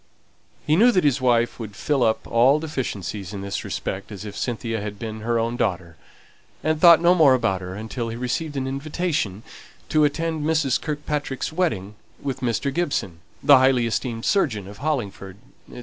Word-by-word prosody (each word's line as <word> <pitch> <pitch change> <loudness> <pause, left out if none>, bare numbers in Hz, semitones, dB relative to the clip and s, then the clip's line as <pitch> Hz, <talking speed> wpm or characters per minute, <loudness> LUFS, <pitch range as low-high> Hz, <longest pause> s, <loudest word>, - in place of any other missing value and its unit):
He 155 - +3
knew 235 +8 +6
that 185 - +3
his 145 -2 +2
wife 120 -2 +2
would 105 -3 -7
fill 140 +6 0
up 110 -2 +1
all 125 +5 +4
deficiencies 105 - -4
in 100 - -5
this 100 0 -4
respect 95 +3 -5
as 105 0 -7
if 100 -1 -7
Cynthia 115 -2 -3
had 105 0 -6
been 110 0 -6
her 115 +2 0
own 115 +1 -1
daughter; 90 -5 -2 0.7
and 155 0 0
thought 170 -2 +9
no 175 +1 +6
more 155 -7 +6
about 115 -7 0
her 90 0 -6
until 110 +3 -4
he 115 - -5
received 140 +5 -3
an 130 - -1
invitation 140 - -2 0.5
to 155 -1 +3
attend 160 +1 0
Mrs. 155 -4 +1
Kirkpatrick's 150 -1 -3
wedding 110 - -1 0.3
with 135 -3 -4
Mr. 130 +3 -1
Gibson, 135 - -2 0.2
the 140 -1 +8
highly 130 -2 +3
esteemed 115 0 -2
surgeon 110 - +1
of 100 +2 -11
Hollingford, 105 -10 -3 0.3
&c. - - -9
125 Hz, 180 wpm, -23 LUFS, 105-150 Hz, 0.7 s, thought